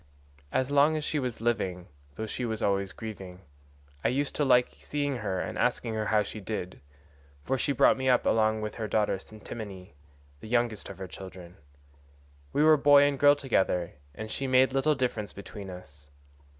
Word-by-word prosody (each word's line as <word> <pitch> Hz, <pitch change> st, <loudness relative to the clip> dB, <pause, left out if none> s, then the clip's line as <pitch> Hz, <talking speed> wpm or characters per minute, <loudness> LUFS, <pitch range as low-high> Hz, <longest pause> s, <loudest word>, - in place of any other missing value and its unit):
As 130 Hz, +1 st, 0 dB
long 145 Hz, +2 st, +4 dB
as 155 Hz, -, -3 dB
she 150 Hz, -, -1 dB
was 125 Hz, -4 st, -2 dB
still 115 Hz, -, -9 dB
living, 95 Hz, -6 st, -1 dB, 0.3 s
though 110 Hz, -, -4 dB
she 115 Hz, +3 st, -4 dB
was 110 Hz, -2 st, -3 dB
always 100 Hz, -1 st, +1 dB
grieving, 95 Hz, -4 st, -8 dB, 0.6 s
I -, -, +3 dB
used 140 Hz, +3 st, -1 dB
to 150 Hz, -, +2 dB
like 125 Hz, -2 st, +3 dB
seeing 145 Hz, -2 st, -2 dB
her 95 Hz, -5 st, -2 dB
and -, -, -4 dB
asking 115 Hz, -, 0 dB
her 110 Hz, -1 st, -2 dB
how 105 Hz, -1 st, +3 dB
she 110 Hz, -, -7 dB
did, 95 Hz, -7 st, -5 dB, 0.6 s
for 135 Hz, -, 0 dB
she 135 Hz, -, 0 dB
brought 135 Hz, -, +4 dB
me 130 Hz, 0 st, 0 dB
up 125 Hz, -, +3 dB
along 110 Hz, -1 st, +2 dB
with 105 Hz, -1 st, -4 dB
her 110 Hz, -2 st, -3 dB
daughter 105 Hz, -1 st, +1 dB
Ctimene, 105 Hz, -2 st, -9 dB, 0.5 s
the -, -, -10 dB
youngest 120 Hz, -2 st, 0 dB
of -, -, -9 dB
her 95 Hz, -1 st, -6 dB
children; 90 Hz, -1 st, -10 dB, 1.0 s
we 150 Hz, -, +2 dB
were 155 Hz, 0 st, +7 dB
boy 145 Hz, 0 st, +7 dB
and 145 Hz, -1 st, +1 dB
girl 145 Hz, 0 st, +7 dB
together, 95 Hz, -, 0 dB, 0.2 s
and 110 Hz, +4 st, -6 dB
she 135 Hz, -, -3 dB
made 130 Hz, 0 st, +4 dB
little 145 Hz, +3 st, +2 dB
difference 125 Hz, -6 st, -2 dB
between 100 Hz, 0 st, -9 dB
us. 75 Hz, -5 st, -12 dB
110 Hz, 190 wpm, -28 LUFS, 95-135 Hz, 1.0 s, were